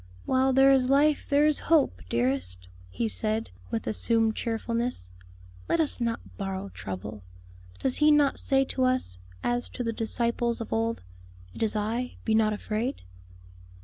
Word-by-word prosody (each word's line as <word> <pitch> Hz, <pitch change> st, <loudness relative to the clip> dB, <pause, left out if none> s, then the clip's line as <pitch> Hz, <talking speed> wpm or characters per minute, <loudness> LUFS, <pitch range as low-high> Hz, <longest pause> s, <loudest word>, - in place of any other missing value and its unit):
"While 265 Hz, 0 st, +2 dB
there 270 Hz, +1 st, +6 dB
is 260 Hz, -2 st, +3 dB
life 290 Hz, +2 st, +3 dB
there 290 Hz, +1 st, +4 dB
is 305 Hz, -1 st, +3 dB
hope, 290 Hz, -, +3 dB
dearest," 115 Hz, -8 st, -1 dB, 0.2 s
he 95 Hz, +5 st, -2 dB
said, 105 Hz, +1 st, -1 dB, 0.2 s
with 110 Hz, -, -3 dB
assumed 225 Hz, -, +1 dB
cheerfulness. 230 Hz, -, -3 dB, 0.6 s
"Let -, -, +2 dB
us 300 Hz, -5 st, +3 dB
not 230 Hz, 0 st, 0 dB, 0.2 s
borrow 195 Hz, 0 st, -4 dB
trouble. 100 Hz, -, -7 dB, 0.6 s
Does 260 Hz, -, +1 dB
He 300 Hz, 0 st, +5 dB
not 295 Hz, -2 st, +3 dB
say 270 Hz, -1 st, +2 dB
to 260 Hz, -, -2 dB
us, 255 Hz, -, 0 dB, 0.2 s
as 240 Hz, 0 st, -1 dB
to 250 Hz, -, -5 dB
the 230 Hz, -1 st, -2 dB
disciples 235 Hz, +1 st, -1 dB
of 230 Hz, -, -5 dB
old, 225 Hz, -, -1 dB, 0.5 s
'It -, -, -10 dB
is 220 Hz, -1 st, +1 dB
I, 225 Hz, +4 st, -2 dB
be 220 Hz, -, +1 dB
not 220 Hz, -1 st, +3 dB
afraid'?" 215 Hz, +5 st, -3 dB
230 Hz, 155 wpm, -27 LUFS, 190-260 Hz, 0.6 s, there